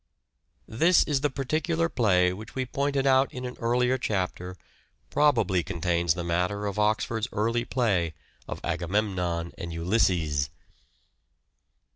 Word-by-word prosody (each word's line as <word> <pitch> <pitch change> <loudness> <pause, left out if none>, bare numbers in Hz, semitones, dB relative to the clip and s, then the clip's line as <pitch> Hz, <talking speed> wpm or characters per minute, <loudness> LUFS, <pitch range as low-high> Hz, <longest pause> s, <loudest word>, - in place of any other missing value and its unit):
This 165 +10 +4
is 140 -3 0
the 145 - +2
particular 155 +5 -1
play 90 - +2
which 110 +4 -10
we 130 -1 -1
pointed 140 +2 -1
out 135 0 +4
in 125 0 -6
an 125 - -6
earlier 125 +2 +1
chapter 90 -4 -3 0.5
probably 115 -12 +3
contains 85 -1 0
the 90 - -4
matter 90 +4 -1
of 100 0 -3
Oxford's 110 +2 0
early 115 +3 0
play 95 -12 0 0.3
of - - -5
" - - -29
Agamemnon 90 -5 -1
and 85 - -5
Ulysses." 85 -5 +1
105 Hz, 130 wpm, -27 LUFS, 90-130 Hz, 0.5 s, This